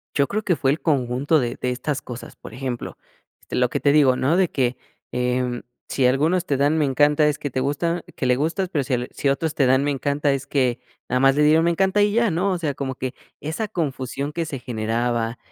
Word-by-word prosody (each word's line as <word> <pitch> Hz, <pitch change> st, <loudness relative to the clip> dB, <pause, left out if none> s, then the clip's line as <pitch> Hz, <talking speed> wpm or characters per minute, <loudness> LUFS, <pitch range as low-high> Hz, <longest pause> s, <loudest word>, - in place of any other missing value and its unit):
Yo 140 Hz, -1 st, +3 dB
creo 215 Hz, +1 st, -2 dB
que 180 Hz, -, +2 dB
fue 135 Hz, -, +2 dB
el 150 Hz, -, -2 dB
conjunto 140 Hz, +1 st, +1 dB
de 120 Hz, -3 st, -2 dB
de 125 Hz, -, 0 dB
estas 140 Hz, +3 st, -3 dB
cosas. 120 Hz, -1 st, -9 dB
Por -, -, -12 dB
ejemplo, 125 Hz, -1 st, -5 dB, 0.5 s
lo 125 Hz, -1 st, +1 dB
que -, -, -2 dB
te 140 Hz, -, +3 dB
digo, 140 Hz, -4 st, +5 dB
¿no?, 140 Hz, +6 st, +2 dB
de 185 Hz, -3 st, +3 dB
que, 125 Hz, -2 st, 0 dB, 0.3 s
em, 125 Hz, 0 st, -1 dB, 0.2 s
si 135 Hz, -, 0 dB
algunos 155 Hz, +8 st, +2 dB
te 140 Hz, -, 0 dB
dan 145 Hz, +3 st, +2 dB
me 150 Hz, -, +2 dB
encanta 145 Hz, +2 st, +3 dB
es 150 Hz, -, 0 dB
que 145 Hz, -, -4 dB
te 130 Hz, -, -2 dB
gusta 165 Hz, +5 st, -1 dB
que -, -, -3 dB
le 125 Hz, 0 st, +3 dB
gustas, 165 Hz, +6 st, -1 dB
pero 150 Hz, -6 st, 0 dB
si 130 Hz, 0 st, -3 dB
l 125 Hz, 0 st, -1 dB
si 140 Hz, -, -1 dB
otros 150 Hz, +3 st, -1 dB
te 140 Hz, -, +3 dB
dan 130 Hz, +2 st, +3 dB
me 145 Hz, -, +1 dB
encanta 140 Hz, +1 st, 0 dB
es 135 Hz, +1 st, -4 dB
que 130 Hz, -4 st, +1 dB, 0.3 s
nada 125 Hz, -, +1 dB
más 135 Hz, 0 st, +5 dB
le 150 Hz, -, +3 dB
dieron 160 Hz, +2 st, +5 dB
me 170 Hz, -, +3 dB
encanta 190 Hz, +4 st, +2 dB
y 205 Hz, 0 st, +3 dB
ya, 235 Hz, 0 st, +3 dB
¿no? 180 Hz, +5 st, 0 dB
O 185 Hz, -, 0 dB
sea, 155 Hz, -4 st, -2 dB
como 135 Hz, -1 st, -4 dB
que 130 Hz, 0 st, -4 dB, 0.3 s
esa 160 Hz, +9 st, -3 dB
confusión 140 Hz, -4 st, -3 dB
que 165 Hz, +1 st, -2 dB
se 140 Hz, -4 st, -5 dB
generaba, 115 Hz, 0 st, -1 dB
140 Hz, 240 wpm, -22 LUFS, 125-160 Hz, 0.5 s, digo